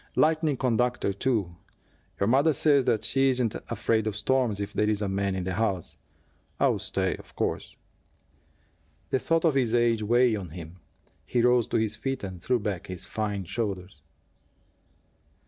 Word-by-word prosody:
Lightning 155 -2 +2
conductor, 125 -4 0
too 100 -6 -1 0.6
your 100 - +2
mother 140 +8 +4
says 140 -3 +3 0.2
she 135 0 +3
isn't 125 -4 +1 0.2
afraid 110 -1 0
of 105 - -2
storms 115 -1 +1
if 100 0 -4
there 105 0 +1
is 105 -1 +1
a - - -1
man 100 0 -1
in 95 - -2
the 95 0 -3
house. 95 -3 -1 0.6
I'll - - +2
stay, - - -1
of - - -16
course." - - -3 1.4
The 130 - +2
thought 165 +4 +1
of 160 - +4
his 125 -4 +1
age 120 -2 +2
weighed 120 +1 +3
on 95 -4 -7
him. 85 +1 -9 0.5
He 120 -2 0
rose 125 -1 +4
to - - 0
his 110 -1 0
feet 135 +1 -3
and 95 -3 -6
threw 125 +6 +1
back 100 -6 -4
his 95 0 -4
fine 105 -2 -3
shoulders. 95 -6 -4
110 Hz, 165 wpm, -27 LUFS, 100-125 Hz, 1.4 s, mother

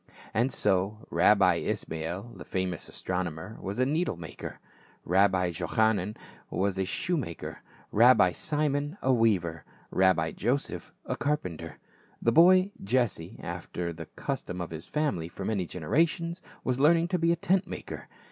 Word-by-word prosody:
And 120 +5 +2
so 100 +2 0
Rabbi - - +5
Ismael, 85 +8 -3
the - - -9
famous 95 -3 -3
astronomer, 90 +2 -4
was 95 +2 -4
a 130 - +3
needle 155 - 0
maker; 80 -4 -8 0.5
Rabbi 95 -1 +3
Jochanan 105 +3 +1 0.3
was 95 0 0
a 95 - +1
shoe 175 - -1
maker, 85 - -5 0.3
Rabbi 110 -5 +6
Simon 145 - -1
a 130 - +4
weaver, 90 - +2 0.3
Rabbi 90 -4 +3
Joseph 125 +6 -2
a - - -2
carpenter. 90 - -3 0.4
The 115 - +2
boy, 185 - +6
Jesse, 105 -6 0
after 85 -1 -4
the 80 -1 -8
custom 90 - -4
of 85 -2 -4
his 80 +1 -6
family 145 - -1
for 95 +3 -7
many 100 -5 -1
generations, 165 - 0 0.2
was 130 0 0
learning 165 +4 +4
to 180 - 0
be 165 +1 +3
a - - +3
tent 185 +3 +1
maker. - - -7
105 Hz, 145 wpm, -29 LUFS, 90-145 Hz, 0.5 s, Rabbi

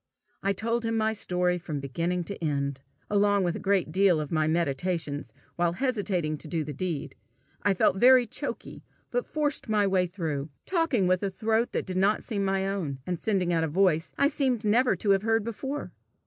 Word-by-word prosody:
I 200 - +1
told 230 +4 -1
him 225 0 0
my 220 0 +1
story 180 -3 0
from 155 -4 -4
beginning 170 +6 -2
to 200 0 -7
end, 140 -3 -1 0.3
along 205 -1 +3
with 175 -2 0
a - - -4
great 195 -5 +1
part 190 -2 +4
of 150 -2 -4
my 155 -1 +2
meditations 160 -1 -1 0.3
while 170 -1 +2
hesitating 190 - -1
to - - -8
do 160 +1 -1
the 150 0 -6
deed. 165 0 -3 0.5
I 205 -1 +2
felt 185 - +3
very 250 +3 +7
choky, - - -6 0.3
but - - -1
forced 295 -6 -2
my 210 -1 +3
way 190 -2 +2
through, 160 -6 -3 0.2
talking 330 - +1
with 185 0 +2
a 200 - 0
throat 220 +4 0
that - - -1
did 185 -1 -3
not 200 +3 +2
seem 205 -5 -2
my 195 0 0
own, 180 -9 -2
and 175 -2 -3
sending 185 -5 +1
out 165 -1 +2
a - - +1
voice 165 0 +2
I 280 - +4
seemed 260 -6 0
never 240 +5 +3
to 205 - +1
have 195 -1 +4
heard 225 0 +1
before. 265 +6 -5
190 Hz, 200 wpm, -27 LUFS, 165-220 Hz, 0.5 s, very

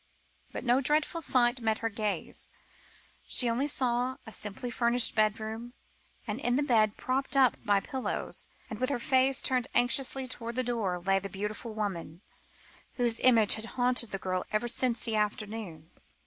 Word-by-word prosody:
But - - -5
no 250 +2 +3
dreadful 300 +4 +1
sight 250 -4 +2
met 220 -1 +1
her 225 - -2
gaze. 205 -4 -2 0.8
She 250 - +4 0.2
saw 275 -3 +1
only 245 +2 0
a 220 - -9
simply 215 +4 -4
furnished 235 0 +2
bedroom, 220 +2 -1 0.5
and 215 0 -3
in 245 -2 +1
the 290 - +2
bed, 220 -6 +2
propped 270 +2 -1
up 260 -2 +5
by 205 -3 +3
pillows, 265 +2 -4 0.2
and 220 - -7
with 255 - 0
her 280 - 0
face 260 +2 +2
turned 255 -2 +1
anxiously 260 +2 +2
towards 235 -2 -4
the 255 - +1
door, 225 -7 -1
lay 195 +2 +2
the 195 +1 -7
beautiful 210 +3 -5
woman, 180 -5 -4 0.7
whose 240 -2 +1
image 230 -5 +6
had 220 - -2
haunted 245 -2 +2
the 195 - -3
girl 185 -1 -2
ever 215 +3 0
since 240 0 +1
the 225 - -2
afternoon. 210 -6 -3
235 Hz, 165 wpm, -30 LUFS, 210-255 Hz, 0.8 s, image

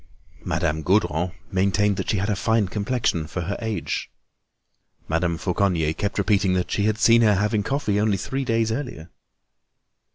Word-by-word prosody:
Madame 80 -2 -1
Gaudron 90 -1 +1 0.2
maintained 100 +2 +2
that - - -3
she 105 - +1
had 100 +2 -1
a - - +1
fine 110 0 +1
complexion 105 -5 -1
for 90 - -4
her 100 +4 -3
age. 110 -2 -3 1.0
Madame 85 +1 0
Fauconnier 90 -5 0
kept 100 +4 -3
repeating 100 -2 +2
that 90 -1 -1
she 100 - 0
had 110 0 +1
seen 115 +2 +5
her 105 -3 +4
having 105 +2 +1
coffee 105 -3 -1
only 105 -2 +2
three 135 +8 -3
days 115 -2 +1
earlier. 110 - -5
100 Hz, 160 wpm, -23 LUFS, 90-110 Hz, 1.0 s, seen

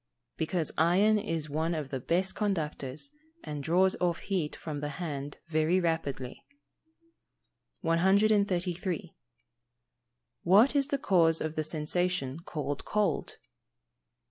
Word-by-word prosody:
_ - - -56
Because 160 0 -1
iron 195 +6 +4
is 165 -7 -2
one 160 +3 -1
of 150 -3 -4
the 135 - -3
best 180 +8 0
conductors, 160 - -2 0.3
and 150 -1 -5
draws 185 +6 +3
off 175 -2 +1
heat 180 -7 -2
from 150 -3 -5
the 145 0 -3
hand 145 -5 -5
very 160 +3 +2
rapidly. 160 -7 -2 1.4
133. 185 0 +1 1.3
_What 210 +11 +5
is 275 -1 +3
the 280 - 0
cause 170 -9 +3
of 155 0 -3
the 155 - -1
sensation 155 -2 -1
called 150 -4 -4
cold? 210 -1 -1
170 Hz, 115 wpm, -30 LUFS, 155-190 Hz, 1.4 s, What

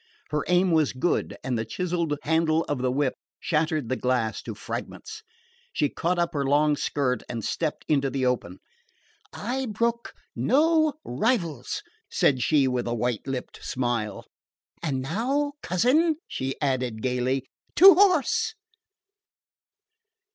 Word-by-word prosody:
Her 150 -1 0
aim 180 +1 +3
was 155 -3 +3
good 130 +7 -1
and 125 -3 -1
the - - -1
chiselled 170 +1 -2
handle 160 0 +2
of 145 -4 -3
the 125 0 0
whip 135 0 +1 0.3
shattered 155 -4 0
the 130 - 0
glass 125 -4 0
to - - -7
fragments. 440 0 -7 0.5
She - - +1
caught 175 +2 -1
up 170 -1 0
her 140 -2 0
long 145 +2 +3
skirt 135 -3 -1
and 115 -3 -4
stepped 160 -3 -2
into 140 -3 +2
the 135 -1 -1
open. 120 -8 -1 0.7
"I 255 +4 -3
brook 235 +2 -2 0.2
no 315 +1 +3
rivals!" 165 - -1 0.3
said 130 -3 +2
she 145 -2 +3
with 125 -2 -1
a 120 - -1
white 120 0 -2
lipped 130 -2 -5
smile. 120 -4 -2 0.6
"And 135 -6 -2
now, 265 - -1
cousin," 255 - +2
she 135 +1 -4
added 130 -5 -1
gaily, 130 +1 0 0.3
"to 385 +4 +10
horse!" 410 - +3
150 Hz, 135 wpm, -26 LUFS, 130-210 Hz, 0.7 s, to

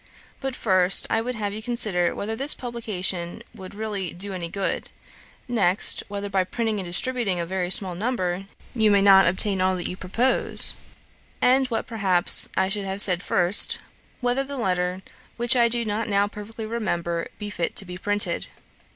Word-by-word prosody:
But 270 -2 -5
first, 185 -4 +3
I 225 - +1
would 250 +2 -5
have 205 -2 -4
you 215 - -7
consider 215 -7 0
whether 220 +2 -5
the 275 +5 +2
publication 210 -5 -3
will 190 -5 -11
really 205 -3 -5
do 195 +3 -4
any 175 -2 -6
good; 195 +2 -4 0.6
next, 205 -6 +2
whether 205 0 -6
by 195 -2 0
printing 220 +2 -3
and 185 - -6
distributing 200 0 -1
a 170 - -3
very 180 0 -4
small 185 -1 +3
number, 185 -3 -3 0.3
you 220 -4 +2
may 200 -1 +3
not 195 -2 +6
attain 190 +2 +1
all 185 0 +1
that 175 - -5
you - - -6
propose; 225 +8 +1 0.6
and, 260 +1 +2
what 230 -3 -4
perhaps 195 -6 +4
I 190 - +1
should 200 +1 -4
have 190 +1 -5
said 180 -3 +7
first, 180 0 +5 0.4
whether 245 +2 -1
the 280 0 -7
letter, 180 -3 -2 0.3
which 240 +1 +3
I 235 -1 +3
do 235 0 +2
not 215 +2 -3
now 200 0 +1
perfectly 210 +2 -9
remember, 175 -7 -4
be 205 -1 -7
fit 170 -4 -4
to 195 - +4
be 180 -1 -9
printed. 205 +2 -2
200 Hz, 175 wpm, -23 LUFS, 185-225 Hz, 0.6 s, said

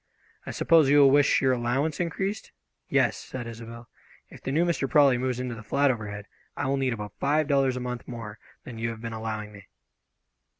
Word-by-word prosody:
"I - - -3
suppose 160 -4 +4
you 145 - +5
will 140 -2 +7
wish 145 0 +4
your 130 - +4
allowance 130 +5 -1
increased?" 190 +4 -3 0.4
"Yes," - - +2
said 130 -2 -7
Isobel, 115 0 -9 0.4
"if - - -13
the 135 - -4
new 160 +5 +2
Mr. 165 -6 -1
Prawley 140 -5 +5
moves 130 -1 -1
into 125 -1 -3
the 115 - -8
flat 140 +6 +2
overhead, 105 -3 -6 0.3
I - - -2
will 135 +1 0
need 130 -2 0
about 105 -2 -7
five 150 +2 +1
dollars 135 -3 +2
a - - -4
month 125 -1 -5
more 110 -3 -8 0.2
than 120 -3 -9
you 115 +1 -1
have 115 -1 -7
been 115 -1 -5
allowing 110 -1 -5
me." 100 -2 -14
125 Hz, 205 wpm, -26 LUFS, 115-140 Hz, 0.4 s, will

